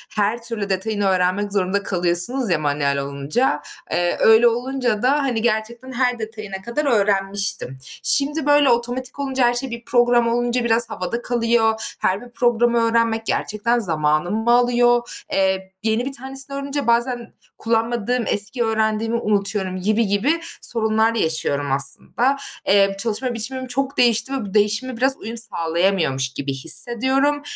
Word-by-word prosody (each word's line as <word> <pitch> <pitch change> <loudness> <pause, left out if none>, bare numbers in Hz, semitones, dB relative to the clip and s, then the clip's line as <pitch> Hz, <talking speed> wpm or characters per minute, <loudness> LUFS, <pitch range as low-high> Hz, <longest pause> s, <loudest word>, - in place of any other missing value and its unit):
her 215 +3 0
türlü 220 -4 -3
detayını 205 +2 -1
öğrenmek 190 +2 0
zorunda 200 +1 0
kalıyorsunuz 180 +8 0
ya 165 -4 +1
manuel 145 -1 -1
olunca, 140 - -1 0.3
eee, 175 0 0
öyle 225 +2 +6
olunca 245 -2 -1
da, 255 - +3
hani, 275 -6 0
gerçekten 235 +3 -2
her 245 -1 0
detayına 215 -3 -7
kadar 235 +8 -3
öğrenmiştim. 195 - 0 0.3
Şimdi 290 +2 +1
böyle 290 -1 +4
otomatik 245 +3 -1
olunca 265 -3 0
her 240 - +1
şey, 250 +1 -4
bir 235 0 -8
program 240 -1 +3
olunca 240 +1 0
biraz 235 0 +2
havada 210 +6 -4
kalıyor. 230 -2 0
Her 190 +2 0
bir 245 - -12
programı 240 -1 +1
öğrenmek 230 -1 +1
gerçekten 230 +4 -1
zamanımı 175 +5 0
alıyor. 240 0 +2
Emm, 190 0 +1 0.2
yeni 225 +2 0
bir 275 - -4
tanesini 270 +1 -2
öğrenince 280 -1 -3
bazen 240 0 0 0.2
kullanmadığım, 230 +1 -1
eski 210 +5 +1
öğrendiğimi 220 0 -1
unutuyorum 200 -3 0
gibi 215 +3 +1
gibi 230 +12 +1 0.2
sorunlar 220 0 +1
da - - -1
yaşıyorum 145 -4 -1
aslında. 140 - 0 0.3
Eee, 195 0 +3
çalışma 235 +4 0
biçimim 255 +3 -1
çok 270 +2 -3
değişti 235 +1 +3
ve 260 -6 -3
bu 190 - -9
değişime 220 +4 +1
biraz 265 +3 +4
uyum 230 +2 -7
sağlayamıyormuş 165 - +1
gibi 140 0 -4
hissediyorum. 260 - +2
230 Hz, 145 wpm, -20 LUFS, 195-245 Hz, 0.3 s, öyle